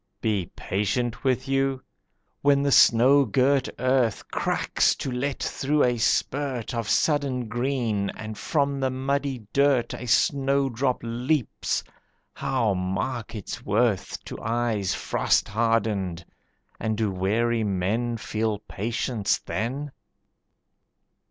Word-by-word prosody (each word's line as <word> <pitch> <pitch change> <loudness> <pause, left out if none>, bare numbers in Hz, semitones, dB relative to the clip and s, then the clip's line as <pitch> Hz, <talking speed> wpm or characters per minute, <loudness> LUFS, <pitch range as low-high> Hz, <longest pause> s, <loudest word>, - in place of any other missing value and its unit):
Be 100 -6 0
patient 110 +5 -2
with 130 0 0
you? 135 -1 0 0.6
When 140 0 +4
the 140 - +1
snow 130 +4 +6
girt 135 +4 +2
earth 130 -3 +1
Cracks - - +1
to 135 - -4
let 130 +3 -2
through 145 +2 +1
a 120 -2 +1
spurt 130 0 0
Of 115 -2 -3
sudden 140 -5 +1
green, 115 -4 -1
and 110 0 -7
from 140 +2 0
the 135 -1 +1
muddy 135 -2 -2
dirt 140 -3 +3
A 125 - -6
snowdrop 135 0 +1
leaps, 125 +4 -1 0.5
how 120 -6 0
mark 95 +6 -3
its 105 - -6
worth 105 -1 0
To - - -7
eyes 115 -4 0
frost - - +1
hardened, 105 -6 0 0.5
and 110 -1 -1
do 110 -3 0
weary 110 +5 +1
men 105 +5 -1
Feel 110 -1 -2
patience 110 0 -1
then? 135 +8 -4
120 Hz, 115 wpm, -25 LUFS, 110-135 Hz, 0.6 s, snow